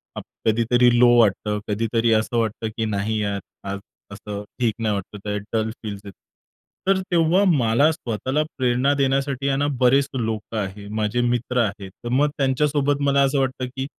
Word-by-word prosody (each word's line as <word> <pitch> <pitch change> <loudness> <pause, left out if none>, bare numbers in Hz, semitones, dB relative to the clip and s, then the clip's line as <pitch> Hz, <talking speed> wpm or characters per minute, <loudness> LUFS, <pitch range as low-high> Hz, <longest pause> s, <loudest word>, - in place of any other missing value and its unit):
Up - - -6 0.2
कधीतरी 120 +2 +3
low 125 0 +7
वाटतं, 105 -1 +2
कधीतरी 115 +2 0
असं 110 +2 +1
वाटतं, 110 -1 -1
की 115 - 0
"नाही 105 +1 -1
यार, 100 -1 -1 0.3
आज 100 0 -3 0.3
असं 100 0 -7 0.2
ठीक 120 -3 +1
नाही 110 -2 0
वाटतं 100 +1 -6
आहे, 105 0 -1
डल 110 -1 +1
फील्स 100 -2 -5
येतं." 100 -3 -11 0.7
तर 195 -1 +3
तेव्हा 170 +3 +3
मला 140 -2 +3
स्वतःला 130 +1 -2
प्रेरणा 130 +2 +2
देण्यासाठी 135 0 0
आहे 135 -1 +1
ना, 145 +1 +1
बरेच 135 +3 +4
लोकं 115 -3 -3
आहे, 100 0 -4
माझे 110 +3 -1
मित्र 120 +1 -1
आहेत. 100 -2 -6
तर - - -2
मग 140 +4 +3
त्यांच्यासोबत 145 +1 +1
मला 140 0 +3
असं 135 +1 +1
वाटतं, 130 -1 -1
की 130 0 -3
120 Hz, 170 wpm, -22 LUFS, 105-135 Hz, 0.7 s, low